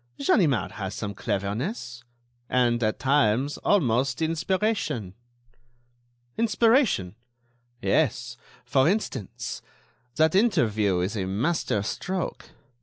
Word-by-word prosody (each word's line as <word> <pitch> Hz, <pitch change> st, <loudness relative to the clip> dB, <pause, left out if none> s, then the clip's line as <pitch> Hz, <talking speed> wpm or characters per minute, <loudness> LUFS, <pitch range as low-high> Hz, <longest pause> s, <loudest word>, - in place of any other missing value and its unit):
"Ganimard 140 Hz, -, +2 dB
has 95 Hz, -3 st, -5 dB
some 105 Hz, -2 st, -4 dB
cleverness; 120 Hz, -, -3 dB, 0.5 s
and, 120 Hz, -1 st, +2 dB
at 110 Hz, -1 st, 0 dB
times, 135 Hz, 0 st, +1 dB
almost 130 Hz, -, +1 dB
inspiration." 165 Hz, -, -1 dB, 1.3 s
"Inspiration!" 225 Hz, -, +3 dB, 0.7 s
"Yes. -, -, +1 dB, 0.3 s
For 135 Hz, +4 st, +3 dB
instance, 155 Hz, -, -3 dB, 0.5 s
that 160 Hz, 0 st, +3 dB
interview 110 Hz, -, +2 dB
is 95 Hz, +5 st, -2 dB
a 95 Hz, -3 st, -2 dB
master 105 Hz, -, 0 dB
stroke. 185 Hz, -, -4 dB
130 Hz, 90 wpm, -26 LUFS, 105-175 Hz, 1.3 s, Inspiration